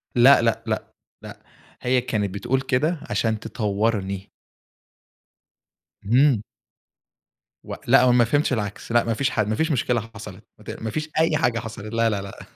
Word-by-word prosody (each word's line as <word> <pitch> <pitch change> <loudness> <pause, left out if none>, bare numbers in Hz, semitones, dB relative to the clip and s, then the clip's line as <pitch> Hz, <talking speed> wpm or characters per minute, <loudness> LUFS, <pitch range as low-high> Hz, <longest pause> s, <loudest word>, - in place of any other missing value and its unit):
لأ 125 +3 +7
لأ، 115 0 0
لأ، 110 - -1 0.4
لأ، - - -11 0.4
هي 125 0 +2
كانت 105 -5 -2
بتقول 130 +6 -1
كده 150 +6 0
علشان 110 -2 0
تطوّرني. 105 -3 -2 1.7
اهم. 120 +1 +3 1.2
و - - -6
لأ، - - +6
هو 125 - +5
ما 120 -1 +5
فهمتش 145 +2 +1
العكس. 105 0 -4
لأ، 120 0 +4
ما 115 - -1
فيش 140 +4 0
حا 110 -4 0
ما 110 +2 -2
فيش 160 +4 0
مشكلة 120 -3 0
حصلِت 100 -4 -10 0.2
مت - - -12
ما 110 - -3
فيش 155 +7 -4
أي 160 -1 +3
حاجة 120 -3 +1
حصلِت. 110 -1 -8
لا 115 0 +2
لا 100 -2 -2
لأ، 100 -1 -10
115 Hz, 160 wpm, -23 LUFS, 105-130 Hz, 1.7 s, لأ